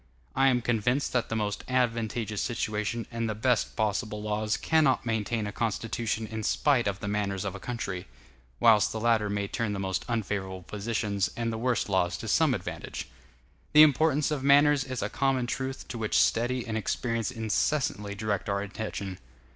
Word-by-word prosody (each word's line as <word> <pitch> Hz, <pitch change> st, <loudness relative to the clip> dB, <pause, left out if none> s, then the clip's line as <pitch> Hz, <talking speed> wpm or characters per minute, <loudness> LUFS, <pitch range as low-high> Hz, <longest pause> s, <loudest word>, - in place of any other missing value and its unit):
I 135 Hz, +1 st, +4 dB
am 125 Hz, -3 st, +2 dB
convinced 120 Hz, +4 st, +1 dB
that 125 Hz, -2 st, 0 dB
the 110 Hz, -, -2 dB
most 105 Hz, -2 st, -2 dB
advantageous 115 Hz, -4 st, 0 dB
situation 110 Hz, 0 st, -2 dB
and 115 Hz, -1 st, -2 dB
the 110 Hz, -, -2 dB
best 125 Hz, +2 st, +1 dB
possible 105 Hz, 0 st, -1 dB
laws 105 Hz, +1 st, -1 dB
cannot 155 Hz, -6 st, +2 dB
maintain 110 Hz, -1 st, -1 dB
a 105 Hz, -, -3 dB
constitution 115 Hz, 0 st, -2 dB
in 110 Hz, 0 st, -5 dB
spite 125 Hz, +1 st, +2 dB
of 100 Hz, -1 st, -2 dB
the -, -, -3 dB
manners 100 Hz, -2 st, -1 dB
of 100 Hz, -, -2 dB
a 100 Hz, -, -7 dB
country; 100 Hz, -6 st, -4 dB, 0.5 s
whilst 110 Hz, -3 st, +5 dB
the 110 Hz, -, -3 dB
latter 110 Hz, -2 st, +2 dB
may 100 Hz, 0 st, -1 dB
turn 110 Hz, 0 st, -2 dB
the 100 Hz, -, -3 dB
most 95 Hz, -1 st, -2 dB
unfavorable 95 Hz, -5 st, -2 dB
positions 105 Hz, -1 st, -1 dB
and 115 Hz, -1 st, -1 dB
the -, -, -3 dB
worst 125 Hz, 0 st, 0 dB
laws 90 Hz, -4 st, +1 dB
to -, -, -7 dB
some -, -, +3 dB
advantage. -, -, -6 dB, 0.6 s
The 150 Hz, 0 st, +10 dB
importance 150 Hz, 0 st, +3 dB
of 145 Hz, -3 st, -2 dB
manners 145 Hz, 0 st, +5 dB
is 130 Hz, -5 st, -4 dB
a 100 Hz, -, -1 dB
common 135 Hz, -2 st, +1 dB
truth 130 Hz, +2 st, -4 dB
to 120 Hz, -, -5 dB
which 110 Hz, -1 st, +1 dB
study 120 Hz, +1 st, +2 dB
and 110 Hz, -, -3 dB
experience 115 Hz, +1 st, -1 dB
incessantly 110 Hz, -2 st, -1 dB
direct 100 Hz, -1 st, -2 dB
our 100 Hz, 0 st, 0 dB
attention. 100 Hz, -2 st, -5 dB
110 Hz, 180 wpm, -28 LUFS, 105-125 Hz, 0.6 s, The